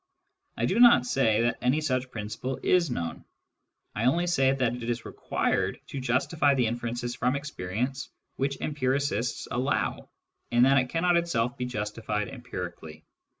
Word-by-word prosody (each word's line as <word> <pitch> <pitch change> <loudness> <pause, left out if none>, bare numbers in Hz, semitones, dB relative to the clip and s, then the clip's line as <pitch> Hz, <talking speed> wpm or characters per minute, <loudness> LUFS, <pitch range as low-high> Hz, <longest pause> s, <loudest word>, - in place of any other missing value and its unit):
I - - +1
do - - +1
not 240 - +7
say 115 -4 +2
that 120 0 0
any 125 +5 +2
such 130 -4 -1
principle 110 +4 -5
is 175 -4 +3
known: 85 -9 -4 0.7
I 110 - -1
only 170 +8 +3
say 135 -7 +3
that 130 -3 +1
it 120 -1 -5
is 120 0 -2
required - - -1
to 140 - -4
justify 140 +4 +2
the 125 -2 +2
inferences 120 +1 -3
from 125 +2 0
experience 130 -1 -3 0.3
which 140 0 -2
empiricists 130 -4 -1
allow, 130 +3 -1 0.4
and 120 +1 +5
that 135 +1 +5
it 130 -1 -1
cannot 170 +3 +2
itself 125 -8 0
be 125 - -3
justified 105 -2 -3
empirically. 90 - -7
125 Hz, 150 wpm, -27 LUFS, 115-140 Hz, 0.7 s, not